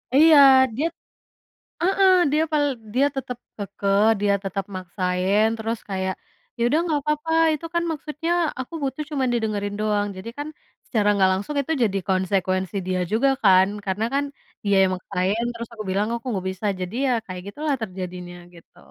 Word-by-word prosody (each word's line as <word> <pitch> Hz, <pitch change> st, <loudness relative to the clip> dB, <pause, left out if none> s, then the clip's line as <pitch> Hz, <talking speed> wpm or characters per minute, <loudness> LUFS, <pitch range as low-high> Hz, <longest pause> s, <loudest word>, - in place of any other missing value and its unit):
Iya, 310 Hz, +1 st, +7 dB, 0.4 s
dia 295 Hz, +7 st, -1 dB, 1.0 s
heeh, 385 Hz, +1 st, +4 dB, 0.2 s
dia 305 Hz, -, +3 dB
pal 295 Hz, -1 st, +3 dB, 0.3 s
dia 275 Hz, +3 st, +4 dB
tetap 250 Hz, -2 st, -4 dB, 0.2 s
kekeh, 200 Hz, 0 st, 0 dB, 0.2 s
dia 205 Hz, -1 st, +2 dB
tetap 195 Hz, 0 st, -3 dB
maksain, 185 Hz, +3 st, 0 dB
terus 225 Hz, +1 st, -3 dB
kayak, 190 Hz, -1 st, -2 dB, 0.4 s
"Ya, -, -, -1 dB
udah 305 Hz, +5 st, +2 dB
nggak 300 Hz, -4 st, 0 dB
papa, 300 Hz, +2 st, -1 dB, 0.2 s
itu 320 Hz, +2 st, -6 dB
kan 340 Hz, -, +2 dB
maksudnya, 310 Hz, +1 st, -4 dB, 0.3 s
aku 260 Hz, +6 st, -7 dB
butuh 275 Hz, +2 st, -2 dB
cuman 265 Hz, -4 st, 0 dB
didengerin 210 Hz, -3 st, -2 dB
doang." 210 Hz, -1 st, +1 dB
Jadi 190 Hz, +5 st, -8 dB
kan, 290 Hz, +1 st, -4 dB, 0.4 s
secara 210 Hz, -4 st, +1 dB
nggak 190 Hz, -1 st, +4 dB
langsung 200 Hz, +11 st, -3 dB
itu 280 Hz, -, -2 dB
jadi 200 Hz, -3 st, 0 dB
konsekuensi 185 Hz, 0 st, 0 dB
dia 185 Hz, -1 st, -1 dB
juga 240 Hz, +6 st, +3 dB, 0.2 s
kan, 190 Hz, -1 st, +6 dB, 0.2 s
karena 195 Hz, +3 st, -1 dB
kan, 280 Hz, +1 st, +1 dB, 0.4 s
dia 200 Hz, -1 st, +2 dB
yang 190 Hz, -1 st, +2 dB
maksain, 190 Hz, +4 st, -1 dB
terus 235 Hz, -1 st, -7 dB
aku 220 Hz, -2 st, -6 dB
bilang, 200 Hz, +3 st, 0 dB
aku 235 Hz, +2 st, -6 dB
nggak 190 Hz, -3 st, -3 dB
bisa, 190 Hz, +3 st, -5 dB
jadi 185 Hz, +3 st, -5 dB
ya, -, -, +2 dB
kayak 185 Hz, -1 st, -7 dB
gitulah, 295 Hz, +7 st, -2 dB
terjadinya, 180 Hz, -3 st, -6 dB, 0.2 s
gitu. 170 Hz, -, -19 dB
210 Hz, 170 wpm, -23 LUFS, 190-275 Hz, 1.0 s, Iya